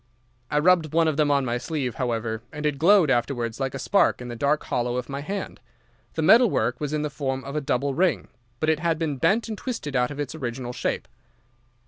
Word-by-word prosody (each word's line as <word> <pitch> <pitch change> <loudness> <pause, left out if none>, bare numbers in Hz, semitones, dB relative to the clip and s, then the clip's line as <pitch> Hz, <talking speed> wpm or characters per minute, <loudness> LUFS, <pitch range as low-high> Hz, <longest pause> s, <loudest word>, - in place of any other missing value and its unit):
I 150 - 0
rubbed 160 -1 +3
one 165 0 +3
of 155 - +1
them 150 0 +2
on 140 -2 +2
my 120 0 -1
sleeve, 140 -4 -3
however, 115 -2 -2
and 150 +1 -6
it 145 -2 0
glowed 175 -2 +5
afterwards 120 -1 -1
like 135 -1 -2
a - - -2
spark 195 +9 +2
in 125 0 -7
the 120 - -5
dark 145 +5 +1
hollow 120 0 -1
of 125 +1 -4
my 140 +1 -4
hand. 195 +7 -5 0.6
The 160 - -1
metal 230 +8 +7
work 125 -6 -1
was 150 -1 -2
in 150 0 -1
the 150 - -1
form 135 -1 -3
of 140 - -7
a 150 - 0
double 135 +1 0
ring, 155 - +1 0.3
but 155 - -1
it 155 - 0
had 165 0 0
been 155 -4 -2
bent 215 - +2
and 220 - -4
twisted 205 - -5
out 125 -1 +2
of 145 0 -7
its 145 -1 -3
original 125 -4 -5
shape. - - -2
145 Hz, 230 wpm, -25 LUFS, 125-160 Hz, 0.6 s, metal